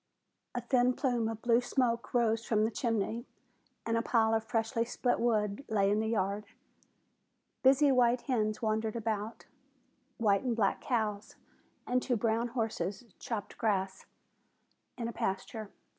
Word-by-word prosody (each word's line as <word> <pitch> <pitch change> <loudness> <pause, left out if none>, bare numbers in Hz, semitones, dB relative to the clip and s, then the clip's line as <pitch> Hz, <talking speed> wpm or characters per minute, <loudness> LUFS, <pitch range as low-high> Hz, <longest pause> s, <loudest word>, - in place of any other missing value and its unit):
A 245 - -1
thin 250 +1 +3
plume 245 -4 0
of 225 -1 -6
blue 235 0 +4
smoke 245 -2 0
rose 230 -2 +2
from 215 -2 +2
the 225 - -1
chimney, 230 +1 -1 0.6
and 230 - 0
a 230 - +2
pile 225 -1 +2
of 220 0 +1
freshly 225 0 0
split 245 +1 0
wood 215 0 +1
lay 200 -2 +2
in 210 - +2
the 220 - 0
yard. 205 -1 -1 1.2
Busy 275 +2 +5
white 245 -1 +3
hens 215 -5 -1
wandered 220 0 0
about. 220 -1 -3 0.7
White 205 -4 +3
and 245 -3 -1
black 200 -4 +1
cows 215 -3 -2 0.5
and 250 0 +1
two 250 - 0
brown 230 +2 +1
horses 220 -4 -2 0.2
cropped 220 -4 -5
grass 190 -4 -1 0.9
in 235 -2 -3
a 235 - -5
pasture. 205 +2 -3
225 Hz, 145 wpm, -31 LUFS, 215-240 Hz, 1.2 s, Busy